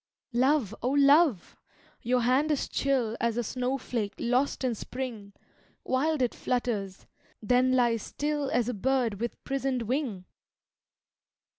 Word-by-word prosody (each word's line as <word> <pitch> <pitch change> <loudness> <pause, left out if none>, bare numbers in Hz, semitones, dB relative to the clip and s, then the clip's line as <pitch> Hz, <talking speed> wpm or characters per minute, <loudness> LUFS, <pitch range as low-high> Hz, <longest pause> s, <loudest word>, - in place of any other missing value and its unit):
"Love, 255 -3 +2
O 245 - 0
Love! 280 - +4 0.5
your 245 +1 +1
hand 260 +6 +2
is 295 -3 0
chill 255 -5 0
As 235 -1 0
a 240 - 0
snowflake 250 -3 -2
lost 250 +4 0
in 255 -2 +1
spring, 230 -3 -6 0.5
Wild 285 +2 +1
it 245 - 0
flutters 220 -6 -2 0.3
then 250 +4 +2
lies 240 -3 +2
still 295 +2 -2
As 240 -2 +1
a 250 - -1
bird 240 -1 0
with 235 - -4
prisoned 270 -2 -1
wing!" 230 -6 -2
250 Hz, 130 wpm, -28 LUFS, 230-270 Hz, 0.5 s, Love